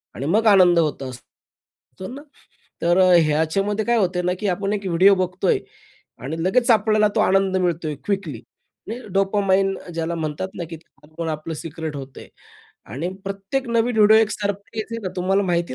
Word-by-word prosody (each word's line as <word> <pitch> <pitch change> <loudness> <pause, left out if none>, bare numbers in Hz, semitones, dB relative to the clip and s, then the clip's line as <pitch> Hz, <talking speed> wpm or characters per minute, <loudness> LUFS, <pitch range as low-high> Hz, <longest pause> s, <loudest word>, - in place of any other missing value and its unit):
आणि 135 - -5
मग 210 +9 +2
आनंद 180 -4 +6
होत 150 -4 -1
असतो 130 +7 -13
ना, 280 - -8 0.6
तर 175 +1 +2
अ, 185 -1 +5
ह्याच्यामध्ये 195 +8 0
काय 235 0 +2
होतंय 180 -4 +1
ना 180 0 +1
की 210 - -2
आपण 195 +3 -1
एक 200 -1 -4
व्हिडिओ 185 +3 +5
बघतोय 185 0 0 0.6
आणि 160 +6 -4
लगेच 235 +6 +2
आपल्याला 215 -1 +3
तो - - +2
आनंद 195 0 +2
मिळतो 170 -3 -1
आहे, 150 - -3
क्विकली, 190 - -3 0.5
म्हणजे 235 +2 -7
डोपामाइन 195 -1 +1
अ, - - -12
ज्याला 165 +1 -2
म्हणतात 155 +2 -3
ना 175 - -3
की 165 - -7 0.3
आपण 160 +2 -6
आपलं 155 +1 -4
सिक्रेट 160 0 -6
होतंय 135 -1 -9 0.7
आणि 155 +8 -3 0.2
प्रत्येक 200 +7 -3
नवीन 230 -1 +2
व्हिडिओ 215 0 +6
एक 220 -1 +3
सरप्राईज 205 +2 -4
आहे 230 - -4
ना 190 - -2
तुम्हाला 190 +2 +1
माहिती 170 -6 -1
185 Hz, 175 wpm, -22 LUFS, 165-205 Hz, 0.7 s, आनंद